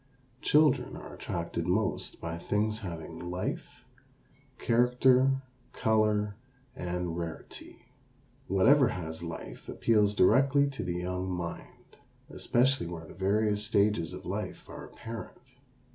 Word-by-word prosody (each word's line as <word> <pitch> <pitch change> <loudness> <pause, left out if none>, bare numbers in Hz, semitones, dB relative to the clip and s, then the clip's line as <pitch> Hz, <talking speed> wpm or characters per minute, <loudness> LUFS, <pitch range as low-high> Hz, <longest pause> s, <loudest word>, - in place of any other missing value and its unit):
Children 150 -2 +3
are - - -9
attracted 85 0 -4
most 105 +5 0
by 85 0 -5
things 105 +4 0
having 85 -6 -7
life, 90 +1 -5 0.7
character, 125 +3 +3 0.3
color, 105 -2 +1 0.4
and 90 -1 -3
rarity. 85 -1 -7 0.6
Whatever 125 +9 +5
has 80 -6 -5
life 85 -1 -7
appeals 105 -2 +2
directly 135 +8 +4
to 135 - -5
the 90 -1 -2
young 90 +1 -3
mind, 85 -2 -7 0.3
especially 130 -4 +1
where 85 -1 -7
the - - -12
various 105 +2 +1
stages 100 -5 +2
of 90 +1 -9
life 100 +4 -5
are - - -9
apparent. 115 0 -8
100 Hz, 115 wpm, -30 LUFS, 90-115 Hz, 0.7 s, Whatever